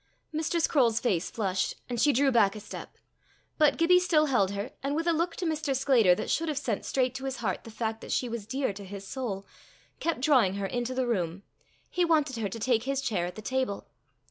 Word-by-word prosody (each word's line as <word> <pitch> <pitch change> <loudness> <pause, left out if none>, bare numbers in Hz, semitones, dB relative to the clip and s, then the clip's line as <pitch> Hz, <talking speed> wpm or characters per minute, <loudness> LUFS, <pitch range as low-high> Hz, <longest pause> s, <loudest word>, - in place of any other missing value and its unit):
Mrs. 320 +2 +1
Croale's 235 -7 +3
face 190 -7 0
flushed, 190 -4 -1
and 240 -2 -2
she 295 - +5
drew 275 +1 +3
back 220 -4 +4
a - - -6
step. 205 - -9 0.6
But 300 -2 +4
Gibbie 360 +2 +5
still 325 -4 +3
held 245 -9 +2
her, 200 +5 -4
and 275 +1 -1
with 325 +2 -1
a 340 - +3
look 335 +1 0
to 365 - -3
Mr. 310 -4 -1
Sclater 245 -9 +4
that - - -4
should 330 0 0
have 300 - -2
sent 235 -8 -2
straight 255 -2 +1
to 265 +1 -6
his 265 -1 -2
heart 215 -6 -3
the - - -8
fact 225 0 -3
that - - -7
she 250 - +1
was 230 -3 -5
dear 260 -2 -1
to 200 +1 -9
his 200 0 -8
soul, 205 -7 -4 0.5
kept 330 -6 -1
drawing 255 -10 +4
her 200 0 -2
into 245 +4 -2
the 260 0 +1
room; 185 -5 -1 0.4
he 360 - 0
wanted 305 -7 +2
her 215 -3 -2
to 225 - -6
take 230 0 +1
his 275 0 0
chair 205 -10 -1
at 180 - -8
the 215 - -9
table. 260 -4 -2
245 Hz, 230 wpm, -28 LUFS, 205-285 Hz, 0.6 s, she